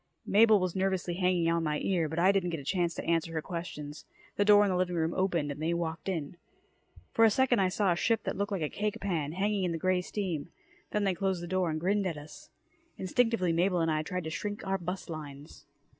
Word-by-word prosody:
Mabel 215 0 +5
was 185 -1 -2
nervously 190 -2 0
hanging 180 -1 +1
on 170 0 +1
my 150 -1 0
ear, 170 -4 0
but 160 - -5
I 185 +3 +5
didn't 195 -3 0
get 165 -2 -3
a - - -9
chance 175 +2 0
to - - -5
answer 165 -1 0
her 160 - -1
questions. 150 -4 -6 0.3
The 205 - +2
door 205 0 +7
in 200 - +1
the - - 0
living 180 -1 0
room 165 0 0
opened 170 -6 0
and 145 +2 -7
they 165 +2 0
walked 165 0 -3
in. 165 -3 -4 0.7
For 225 - +3
a 225 - +8
second 245 +1 +3
I 190 -1 +3
saw 195 0 +1
a - - +2
ship 225 +4 +1
that - - -2
looked 200 +1 -2
like 190 -5 -1
a - - +1
cake 210 +6 -3
pan, 160 -7 -2
hanging 200 +2 0
in 175 -2 0
the - - -2
grey 185 +2 +1
steam. 180 -6 -3 0.4
Then 210 - 0
they 195 -2 +2
closed 185 0 -1
the - - -5
door 185 -1 0
and 155 0 -2
grinned 195 +3 +1
at 165 -4 -3
us. 145 +1 -12 0.5
Instinctively, 190 -2 +1
Mabel 180 +2 +2
and 165 -1 +1
I 155 0 +1
tried 180 +3 -4
to 160 - -5
shrink 205 +5 -4
our 195 0 0
bust 180 +2 -5
lines. 150 -3 -9
180 Hz, 245 wpm, -30 LUFS, 165-195 Hz, 0.7 s, a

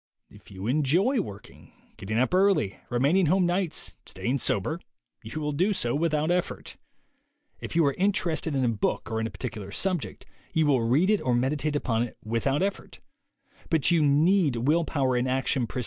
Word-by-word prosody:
If - - -17
you 95 0 -8
enjoy 160 - +2
working, 100 - -11 0.2
getting 110 +3 -4
up 130 +7 +1
early, 185 - +2
remaining 145 +9 +2
home 185 +3 +3
nights, 175 -1 -1
staying 130 +3 -2
sober, 125 - -1 0.4
you 110 +8 -6
will 150 -1 -2
do 185 +8 +1
so 120 -10 -1
without 155 +1 0
effort. 180 0 -2 0.8
If - - -7
you 165 -2 +4
are 140 - +2
interested 170 -5 0
in 130 -2 +1
a - - +2
book 115 +1 -2
or 110 - -1
in 110 - -1
a - - -9
particular 110 -6 -6
subject, 185 - -2 0.3
you 160 -1 +2
will 135 -4 +3
read 140 - +2
it 210 - +2
or 125 -2 +1
meditate 145 +4 0
upon 115 -5 0
it 120 - -4
without 135 +8 0
effort. 200 0 -4
145 Hz, 150 wpm, -26 LUFS, 120-175 Hz, 0.8 s, you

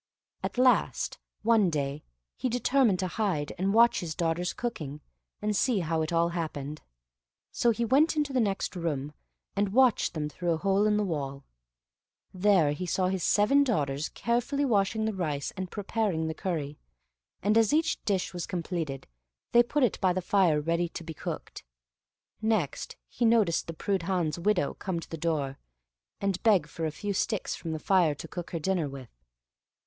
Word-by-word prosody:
At - - -4
last, 255 0 +2 0.2
one 220 -4 +4
day, 145 -2 -2 0.3
he 255 - -2
determined 245 -3 +3
to 185 - 0
hide, 180 -8 -1
and 190 +2 +1
watch 235 +3 +5
his 160 -3 -4
daughters 170 +1 0
cooking, 150 - -5 0.4
and 210 0 0
see 230 -3 +2
how 160 -1 0
it 155 - -2
all 170 0 +2
happened; 155 -4 -4 0.7
so 240 - +2
he 235 +1 +1
went 285 +8 +4
into 295 -2 0
the 255 - +2
next 200 -3 -1
room, 150 -4 -3 0.4
and 200 0 +1
watched 255 -6 +3
them 150 -1 -1
through 170 +3 -1
a - - -1
hole 195 +4 +2
in 210 0 +3
the 210 - +1
wall. 140 -6 -3 0.9
There 185 -5 +4
he 180 +5 -4
saw 185 +2 +1
his 190 -1 -2
seven 250 +8 +4
daughters 145 - -1
carefully 245 +6 0
washing 220 -2 +1
the 220 - -1
rice 150 -7 -2
and 185 -1 -4
preparing 205 -5 -1
the 160 - -2
curry, 155 -4 -3 0.6
and 210 +2 +3
as 225 -2 +4
each 320 +1 +1
dish 195 -3 -1
was 175 -2 -4
completed, 165 -6 -3 0.5
they 240 - +7
put 275 +4 0
it 240 - +1
by 185 -2 +3
the 185 - -1
fire 180 -5 +3
ready 170 +3 0
to 170 - -7
be 160 0 -7
cooked. - - -6 0.8
Next 215 -10 -1
he 240 - -4
noticed 225 -7 +3
the 165 - -4
Prudhan's 180 -3 -1
widow 180 -4 +1
come 185 -3 -3
to - - -10
the - - -3
door, 150 -4 -2 0.6
and 195 -2 -1
beg 205 -9 +4
for 160 +2 -4
a - - -3
few 200 +6 -3
sticks 210 +1 -1
from 165 - -5
the 160 - -2
fire 170 -2 +3
to 165 - -8
cook 175 +1 -6
her 165 - -3
dinner 175 -3 0
with. 135 -3 -10
185 Hz, 180 wpm, -28 LUFS, 160-215 Hz, 0.9 s, they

